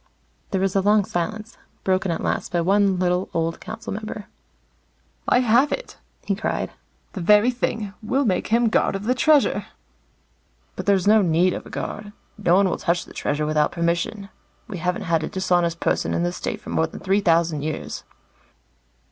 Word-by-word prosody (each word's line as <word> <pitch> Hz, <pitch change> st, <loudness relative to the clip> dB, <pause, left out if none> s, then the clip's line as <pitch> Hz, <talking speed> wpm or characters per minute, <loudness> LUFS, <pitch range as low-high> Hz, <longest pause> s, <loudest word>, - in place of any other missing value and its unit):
There 195 Hz, -, 0 dB
was 195 Hz, 0 st, 0 dB
a 195 Hz, -, +4 dB
long 205 Hz, 0 st, +3 dB
silence, 215 Hz, +7 st, -4 dB, 0.2 s
broken 190 Hz, 0 st, +1 dB
at 165 Hz, -, -2 dB
last -, -, -2 dB
by 175 Hz, -1 st, +1 dB
one 195 Hz, +1 st, +3 dB
little, 180 Hz, 0 st, 0 dB
old 165 Hz, 0 st, -1 dB
council -, -, -6 dB
member. 215 Hz, 0 st, -6 dB, 1.0 s
"I 250 Hz, -, +4 dB
have 245 Hz, +4 st, +4 dB
it," -, -, -5 dB, 0.3 s
he 200 Hz, -, 0 dB
cried. 200 Hz, -, -2 dB, 0.4 s
"The 190 Hz, -, -5 dB
very 210 Hz, +7 st, +5 dB
thing. 225 Hz, -4 st, -3 dB
We'll 265 Hz, +6 st, 0 dB
make 185 Hz, -5 st, 0 dB
him 230 Hz, +1 st, +3 dB
guard 215 Hz, -, +1 dB
of 195 Hz, -, -4 dB
the 245 Hz, +4 st, +2 dB
Treasure." 295 Hz, +2 st, +3 dB, 1.1 s
"But -, -, -6 dB
there's 195 Hz, -3 st, +3 dB
no 215 Hz, +1 st, +6 dB
need 175 Hz, 0 st, +3 dB
of -, -, -6 dB
a -, -, -11 dB
guard. 205 Hz, 0 st, -6 dB, 0.2 s
No 180 Hz, -4 st, +2 dB
one 195 Hz, +1 st, +4 dB
will -, -, -2 dB
touch 175 Hz, 0 st, 0 dB
the -, -, -14 dB
Treasure 150 Hz, +1 st, -1 dB
without 150 Hz, 0 st, +1 dB
permission. 170 Hz, +4 st, -1 dB, 0.4 s
We 190 Hz, -4 st, -6 dB
haven't 180 Hz, +1 st, -1 dB
had 165 Hz, -2 st, +1 dB
a -, -, -3 dB
dishonest 175 Hz, -3 st, 0 dB
person -, -, 0 dB
in 170 Hz, -, 0 dB
the 175 Hz, -, 0 dB
State -, -, -4 dB
for -, -, -8 dB
more 160 Hz, -, +1 dB
than -, -, -10 dB
three 195 Hz, +1 st, +1 dB
thousand 165 Hz, -4 st, +2 dB
years." 155 Hz, +1 st, -4 dB
190 Hz, 185 wpm, -23 LUFS, 170-210 Hz, 1.1 s, no